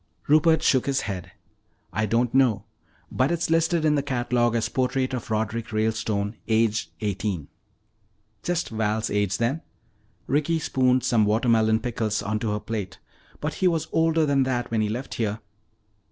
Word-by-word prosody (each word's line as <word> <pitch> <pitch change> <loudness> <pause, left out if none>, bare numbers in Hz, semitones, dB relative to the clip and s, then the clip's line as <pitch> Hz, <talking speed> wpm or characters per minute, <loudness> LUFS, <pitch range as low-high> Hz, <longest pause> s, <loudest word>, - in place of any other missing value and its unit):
Rupert 155 +2 +4
shook 130 0 +3
his 135 -1 +1
head. 95 -4 -5 0.6
"I 110 +4 0
don't 115 +2 +1
know. 125 -6 +3 0.5
But 130 +2 +1
it's 170 -1 -1
listed 165 0 +2
in 150 - +4
the 145 - +2
catalogue 120 -3 0
as 115 - +1
'Portrait 130 0 -1
of 125 -1 -4
Roderick 110 +1 -2
Ralestone, 110 -1 -1
Aged 110 -6 +1
Eighteen.'" 100 -6 -2 0.9
"Just 175 0 -1
Val's 110 0 -1
age, 105 -2 0
then." 130 +7 0 0.6
Ricky 150 +4 +1
spooned 130 -4 +2
some 115 -3 +3
watermelon 110 0 +3
pickles 110 -3 -2
onto 110 +2 -1
her 105 - -1
plate. 105 -5 -5 0.4
"But 150 +1 -2
he 185 - +5
was 165 -3 0
older 160 -1 +3
than 140 -2 +2
that 125 -2 -1
when 110 -1 +1
he 105 - 0
left 125 +5 -4
here." 110 -2 -2
115 Hz, 155 wpm, -25 LUFS, 110-135 Hz, 0.9 s, he